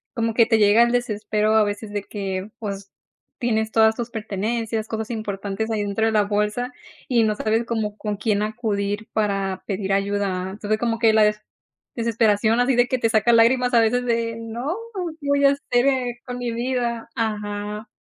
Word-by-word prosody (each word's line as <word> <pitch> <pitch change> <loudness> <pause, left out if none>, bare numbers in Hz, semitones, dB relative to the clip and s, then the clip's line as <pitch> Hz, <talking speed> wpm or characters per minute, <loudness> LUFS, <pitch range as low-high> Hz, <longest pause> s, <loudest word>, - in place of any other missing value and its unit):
como 230 -2 0
que 230 0 +4
te 225 -2 +3
llega 210 +1 +5
el 235 0 +4
desespero 215 -3 0
a 220 -1 +5
veces 205 +1 -4
de 205 -1 -2
que, 195 -1 -4
pues, 200 -3 -6 0.5
tienes 220 -2 0
todas 220 0 +4
tus 240 +1 -4
pertenencias, 220 +1 -3
cosas 220 +1 -4
importantes 205 -1 -3
ahí 215 -2 -1
dentro 205 +2 0
de - - +1
la 210 -1 +3
bolsa, 210 +4 -1 0.4
y 240 -3 +3
no 215 -1 +1
sabes 220 +2 0
como 220 -3 -2
con 210 -2 -3
quién 210 -1 0
acudir 210 -1 -2
para 195 -3 -1
pedir 195 -1 -1
ayuda. 195 -2 -1
Entonces, 215 +2 -2
como 230 -1 0
que 225 -1 +4
la 220 - +5
des 210 0 +2 0.6
desesperación, 225 -1 +2
así 250 +1 +3
de 245 0 +4
que 255 - 0
te 230 -2 +1
saca 225 +1 +3
lágrimas 245 +2 +4
a - - +7
veces 245 +2 +2
de: 230 -1 0
"No, 235 +8 -4 0.5
¿qué 285 - -6
voy 280 0 +3
a 275 - +7
hacer 270 -3 0 0.4
con 250 -1 -5
mi 245 -1 -2
vida?". 235 -1 -2
Ajá, 210 -1 -3
220 Hz, 185 wpm, -23 LUFS, 205-235 Hz, 0.6 s, a